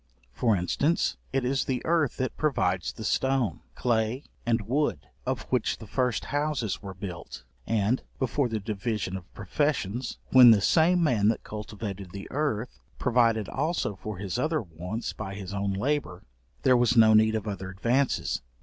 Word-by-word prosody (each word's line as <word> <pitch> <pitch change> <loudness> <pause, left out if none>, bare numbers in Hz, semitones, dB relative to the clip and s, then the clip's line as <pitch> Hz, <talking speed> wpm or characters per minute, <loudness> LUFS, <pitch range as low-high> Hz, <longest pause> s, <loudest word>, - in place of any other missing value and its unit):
For 115 - +2
instance, 140 - +1
it 135 -1 0
is 135 +2 +1
the 130 -2 -2
earth 160 -5 +1
that 130 -1 -2
provides 95 - 0
the 110 - -9
stone, 130 -1 +1 0.2
clay, 120 +2 0 0.2
and 115 -1 +2
wood, 145 +7 0 0.2
of 130 -1 -1
which 125 -3 +1
the 110 - -10
first 125 +1 -1
houses 145 -8 -1
were 95 -2 -8
built; 90 -2 -7 0.2
and, 110 +3 +1 0.2
before 130 0 0
the 110 -1 -2
division 105 -1 -3
of 90 -2 -8
professions, 125 - -1
when 125 -2 +9
the 110 -3 +7
same 170 - +4
man 115 -9 +3
that 110 - +1
cultivated 105 -2 -6
the 100 0 -7
earth 130 -6 -2 0.2
provided 115 -4 +2
also 160 - -1
for 105 +1 -6
his 100 +4 -3
other 155 0 0
wants 90 +6 -5
by 100 -2 -6
his 100 -1 -7
own 100 0 -1
labour, 100 -3 -1 0.4
there 130 - +5
was 120 0 +3
no 110 -1 +7
need 110 0 +5
of 110 -1 -3
other 95 -2 -4
advances. 120 +8 0
115 Hz, 165 wpm, -27 LUFS, 100-130 Hz, 0.4 s, when